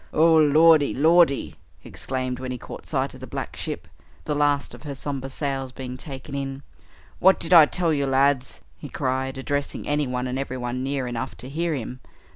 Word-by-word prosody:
"Oh, 165 +1 +5
Lordy, 155 0 +5
Lordy!" 160 0 +4 0.3
he - - -15
exclaimed 130 -1 -4
when 130 0 -5
he 125 - -3
caught - - -10
sight - - -1
of - - -12
the - - -9
black - - -5
ship, - - -5 0.4
the - - -1
last 145 -1 +1
of - - -11
her 145 -2 -6
somber 135 -1 -4
sails 135 -1 -3
being 125 -1 -7
taken 135 +1 -8
in, 135 0 -4 0.6
"what 190 +1 +5
did 170 +1 -1
I 160 -3 +9
tell 170 -1 0
you, 140 -2 0
lads?" 135 0 +1 0.2
he 145 - -8
cried, 130 0 -2
addressing 140 +1 -3
anyone 130 -4 -1
and 130 +1 -3
everyone 125 -2 -3
near 135 0 -2
enough 120 -2 -4
to 130 - -8
hear 165 +2 -1
him. 125 0 -6
135 Hz, 190 wpm, -24 LUFS, 130-150 Hz, 0.6 s, I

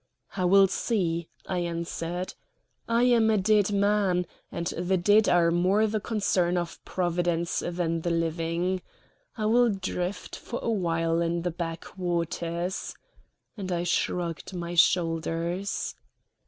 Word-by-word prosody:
"I 185 - 0
will 195 +2 +7
see," 170 -6 -1 0.2
I 185 - -2
answered. 170 +1 -3 0.6
"I 230 +1 +3
am 235 -3 +4
a 220 - +3
dead 205 0 +3
man, 200 -3 +2 0.3
and 170 - -4
the 180 +3 0
dead 205 +4 +4
are 170 -1 +4
more 185 +5 +3
the 215 0 0
concern 195 -5 +1
of 175 -1 -4
Providence 175 -1 0
than 170 -1 -1
the 175 - -1
living. 170 +2 -1 0.6
I 215 - -1
will 240 +2 +4
drift 190 -1 -3
for 240 - -6
a 230 - 0
while 165 -4 +1
in 170 0 0
the 175 - -1
back 165 0 -6
waters," 170 0 -2 0.6
and 190 -4 -5
I 175 -1 0
shrugged 175 0 -1
my 170 -1 -4
shoulders. 170 +2 +1
175 Hz, 135 wpm, -27 LUFS, 170-195 Hz, 0.6 s, will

